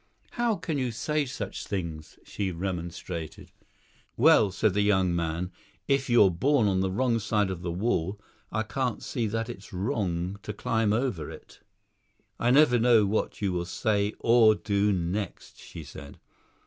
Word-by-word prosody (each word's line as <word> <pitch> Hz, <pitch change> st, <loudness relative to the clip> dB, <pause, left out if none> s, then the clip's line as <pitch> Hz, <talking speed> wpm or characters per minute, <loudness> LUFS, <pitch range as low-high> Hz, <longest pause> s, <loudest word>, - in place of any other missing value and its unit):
"How 240 Hz, -2 st, 0 dB
can 160 Hz, -5 st, -3 dB
you 130 Hz, -2 st, 0 dB
say 145 Hz, +6 st, -1 dB
such 105 Hz, -5 st, -6 dB
things!" 85 Hz, -6 st, -5 dB
she 100 Hz, -2 st, -3 dB
remonstrated. 85 Hz, -2 st, -5 dB, 0.7 s
"Well," 100 Hz, -, +5 dB
said 105 Hz, +2 st, +1 dB
the 105 Hz, -, +2 dB
young 95 Hz, -4 st, +2 dB
man, 85 Hz, +2 st, -2 dB, 0.4 s
"if 135 Hz, -1 st, +1 dB
you're 110 Hz, -5 st, +6 dB
born 120 Hz, -, +2 dB
on 95 Hz, -2 st, +1 dB
the 95 Hz, 0 st, +1 dB
wrong 115 Hz, +4 st, +1 dB
side 105 Hz, -2 st, 0 dB
of 90 Hz, -2 st, -5 dB
the 85 Hz, -1 st, -3 dB
wall, 95 Hz, 0 st, -1 dB, 0.3 s
I 110 Hz, +1 st, 0 dB
can't 125 Hz, +2 st, -2 dB
see 120 Hz, -5 st, -2 dB
that 115 Hz, +2 st, -2 dB
it's 105 Hz, -5 st, -9 dB
wrong 95 Hz, -3 st, -2 dB
to 105 Hz, -, -6 dB
climb 110 Hz, +1 st, 0 dB
over 110 Hz, -, -1 dB
it." -, -, -13 dB, 0.8 s
"I 120 Hz, -, +2 dB
never 130 Hz, -2 st, +5 dB
know 115 Hz, -2 st, +5 dB
what 105 Hz, +1 st, -2 dB
you 100 Hz, -, +1 dB
will 85 Hz, -1 st, -2 dB
say 105 Hz, +2 st, 0 dB
or 115 Hz, -2 st, +5 dB
do 100 Hz, 0 st, +1 dB
next," 90 Hz, +1 st, -3 dB
she 80 Hz, -, -10 dB
said. 70 Hz, +1 st, -11 dB
105 Hz, 160 wpm, -27 LUFS, 90-115 Hz, 0.8 s, you're